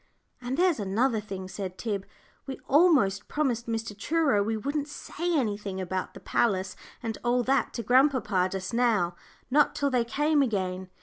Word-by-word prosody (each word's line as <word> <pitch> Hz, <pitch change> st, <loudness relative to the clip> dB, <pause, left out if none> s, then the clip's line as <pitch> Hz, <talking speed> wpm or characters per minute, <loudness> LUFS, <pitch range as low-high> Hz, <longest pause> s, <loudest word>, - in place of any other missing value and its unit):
"And 250 Hz, +2 st, -3 dB
there's 355 Hz, -6 st, +3 dB
another 220 Hz, +4 st, +1 dB
thing," 195 Hz, -3 st, -7 dB
said 185 Hz, -1 st, -6 dB
Tib: 200 Hz, -4 st, -3 dB, 0.4 s
"we 265 Hz, -, -5 dB
almost 265 Hz, -, +4 dB
promised 250 Hz, -6 st, -1 dB
Mr. 225 Hz, -2 st, -3 dB
Truro 285 Hz, -1 st, +1 dB
we 220 Hz, +2 st, -1 dB
wouldn't 285 Hz, +5 st, -2 dB
say 335 Hz, +3 st, -3 dB
anything 205 Hz, -6 st, -2 dB
about 185 Hz, 0 st, -3 dB
the -, -, -9 dB
palace 190 Hz, -4 st, 0 dB, 0.3 s
and 225 Hz, -2 st, -4 dB
all 245 Hz, 0 st, +2 dB
that 270 Hz, +3 st, +1 dB
to 235 Hz, -, -4 dB
grandpapa 245 Hz, -7 st, +3 dB
just 190 Hz, +2 st, -4 dB
now 225 Hz, -8 st, +2 dB, 0.4 s
not 295 Hz, +2 st, +4 dB
till 280 Hz, -1 st, 0 dB
they 250 Hz, -2 st, +2 dB
came 295 Hz, +5 st, +1 dB
again. 190 Hz, -6 st, -1 dB
230 Hz, 165 wpm, -27 LUFS, 195-275 Hz, 0.4 s, almost